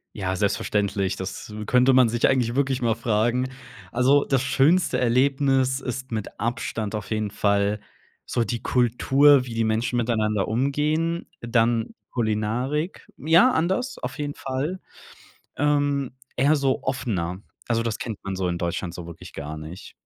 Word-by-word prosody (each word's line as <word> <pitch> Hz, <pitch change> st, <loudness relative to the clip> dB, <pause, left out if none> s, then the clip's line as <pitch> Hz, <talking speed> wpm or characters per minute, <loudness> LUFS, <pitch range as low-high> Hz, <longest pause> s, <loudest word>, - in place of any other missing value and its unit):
Ja, 95 Hz, -2 st, -2 dB
selbstverständlich. 100 Hz, -1 st, 0 dB
Das 95 Hz, +3 st, -6 dB
könnte 125 Hz, +1 st, +4 dB
man 125 Hz, -2 st, +6 dB
sich 120 Hz, +1 st, +2 dB
eigentlich 125 Hz, -2 st, +1 dB
wirklich 135 Hz, -2 st, +1 dB
mal 115 Hz, -2 st, +2 dB
fragen. 120 Hz, +4 st, 0 dB, 0.4 s
Also, 135 Hz, +4 st, +3 dB
das 135 Hz, -2 st, +1 dB
schönste 145 Hz, +6 st, +3 dB
Erlebnis 130 Hz, +1 st, +2 dB
ist 130 Hz, 0 st, -5 dB
mit 110 Hz, -2 st, -5 dB
Abstand 115 Hz, -2 st, -2 dB
auf 105 Hz, -, -6 dB
jeden 110 Hz, -2 st, -1 dB
Fall 100 Hz, 0 st, +1 dB, 0.5 s
so 120 Hz, -, 0 dB
die 115 Hz, +1 st, -3 dB
Kultur, 130 Hz, +3 st, +4 dB
wie 120 Hz, -, -7 dB
die 115 Hz, 0 st, 0 dB
Menschen 115 Hz, +2 st, 0 dB
miteinander 110 Hz, -4 st, 0 dB
umgehen. 150 Hz, +7 st, 0 dB
Dann 115 Hz, -1 st, +1 dB, 0.2 s
Kulinarik 120 Hz, -, -2 dB
ja, 170 Hz, -, +5 dB
anders 190 Hz, +9 st, 0 dB
auf -, -, -5 dB
jeden 145 Hz, -1 st, -3 dB
Fall. 140 Hz, +9 st, -3 dB, 0.8 s
Ähm, 145 Hz, -2 st, +1 dB, 0.2 s
eher 140 Hz, +4 st, +4 dB
so 135 Hz, -2 st, 0 dB
offener. 100 Hz, -9 st, -2 dB, 0.3 s
Also, 115 Hz, -1 st, +1 dB
das 115 Hz, -2 st, -2 dB
kennt 110 Hz, -4 st, -5 dB
man 95 Hz, 0 st, -4 dB
so 95 Hz, -1 st, -1 dB
in 85 Hz, -1 st, -1 dB
Deutschland 85 Hz, 0 st, -3 dB
so 85 Hz, -1 st, -8 dB
wirklich 85 Hz, -1 st, -11 dB
gar 75 Hz, +2 st, -6 dB
nicht. 80 Hz, +4 st, -9 dB
120 Hz, 150 wpm, -24 LUFS, 105-135 Hz, 0.8 s, man